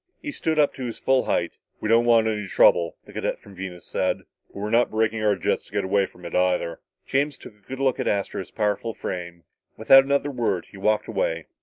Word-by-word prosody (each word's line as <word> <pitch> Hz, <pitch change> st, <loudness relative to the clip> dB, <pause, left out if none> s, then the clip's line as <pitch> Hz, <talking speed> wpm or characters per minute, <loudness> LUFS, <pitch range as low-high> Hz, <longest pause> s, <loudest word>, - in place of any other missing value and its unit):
He 295 Hz, -, -5 dB
stood 160 Hz, -, -2 dB
up 150 Hz, -2 st, +3 dB
to 130 Hz, -, -7 dB
his 120 Hz, -2 st, -4 dB
full 130 Hz, -1 st, +2 dB
height. 85 Hz, -, 0 dB, 0.3 s
"We -, -, -3 dB
don't 115 Hz, +2 st, +4 dB
want 115 Hz, -2 st, +5 dB
any 105 Hz, -2 st, -1 dB
trouble," 85 Hz, -2 st, +4 dB
the -, -, -14 dB
cadet -, -, -2 dB
from 100 Hz, -, -15 dB
Venus 90 Hz, -2 st, -8 dB
said, -, -, -1 dB, 0.2 s
"but -, -, -28 dB
we're 105 Hz, +2 st, -4 dB
not 120 Hz, +1 st, +4 dB
braking 110 Hz, 0 st, 0 dB
our 105 Hz, -1 st, +3 dB
jets -, -, 0 dB
to -, -, -20 dB
get -, -, -1 dB
away 95 Hz, 0 st, +2 dB
from 90 Hz, -, -16 dB
it, 85 Hz, -, -7 dB
either." 90 Hz, -2 st, +1 dB, 0.3 s
James 140 Hz, +1 st, 0 dB
took -, -, -12 dB
a 105 Hz, -2 st, -30 dB
good 130 Hz, 0 st, -6 dB
look 135 Hz, -2 st, +1 dB
at -, -, -1 dB
Astro's 100 Hz, -2 st, -2 dB
powerful 105 Hz, +1 st, -1 dB
frame. 85 Hz, -1 st, -6 dB, 0.3 s
Without 135 Hz, +5 st, +7 dB
another 140 Hz, +1 st, 0 dB
word 115 Hz, -8 st, -1 dB
he 100 Hz, -, -12 dB
walked 105 Hz, +2 st, +1 dB
away. -, -, -1 dB
110 Hz, 225 wpm, -24 LUFS, 95-130 Hz, 0.3 s, Without